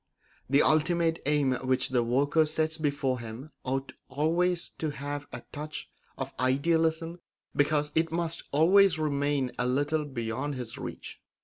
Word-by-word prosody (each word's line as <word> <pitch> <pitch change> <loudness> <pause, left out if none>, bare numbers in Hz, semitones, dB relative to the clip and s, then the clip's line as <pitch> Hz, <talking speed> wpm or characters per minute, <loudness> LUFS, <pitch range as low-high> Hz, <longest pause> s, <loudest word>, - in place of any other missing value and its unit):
The 140 +2 +5
ultimate 165 +1 +2
aim 145 -3 +3
which 130 0 +1
the 125 -2 +2
worker 140 +7 +3
sets 160 +1 -1
before 140 -4 0
him 120 +6 -8
ought 135 +1 -2 0.2
always 170 +5 +1
to 155 - -1
have 145 0 -5
a - - -7
touch 150 +1 -6 0.3
of - - -5
idealism 160 +5 +1 0.4
because 150 0 +2
it 160 0 +1
must 165 0 -1
always 185 +5 +5
remain 145 -3 0
a 125 - +1
little 145 +4 +1
beyond 130 +2 -3
his 120 -3 -5
reach. - - -7
145 Hz, 140 wpm, -29 LUFS, 135-160 Hz, 0.4 s, The